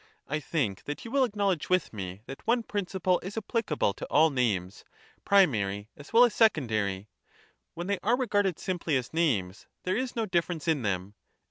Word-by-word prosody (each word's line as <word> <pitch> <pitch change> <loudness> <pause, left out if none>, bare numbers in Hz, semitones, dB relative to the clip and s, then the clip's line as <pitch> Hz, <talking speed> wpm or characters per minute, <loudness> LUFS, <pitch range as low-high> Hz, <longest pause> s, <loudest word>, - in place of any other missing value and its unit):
I 150 +2 -1
think 135 - -2
that 145 +8 -5
you 230 - -7
will 275 0 +3
acknowledge 200 - 0
with 185 -7 +1
me, 95 -1 -6
that 135 - -10
one 235 0 +3
principle 185 -3 0
is 190 +3 -7
apphcable 205 - -1
to - - -6
all 155 +2 +4
names, 105 -7 -1 0.4
primary 110 - +3
as 145 0 -13
well 230 +2 +7
as 235 - 0
secondary 110 - +1 0.3
— - - -36
when 175 - -4
they 200 0 -1
are 235 +5 +2
regarded 205 -8 +1
simply 170 -6 -1
as 125 +3 -5
names, 110 - 0 0.2
there 185 +1 0
is 255 +2 -2
no 225 -2 0
difference 170 -4 -1
in 160 -4 +2
them. 100 -2 -2
165 Hz, 180 wpm, -28 LUFS, -, 0.4 s, well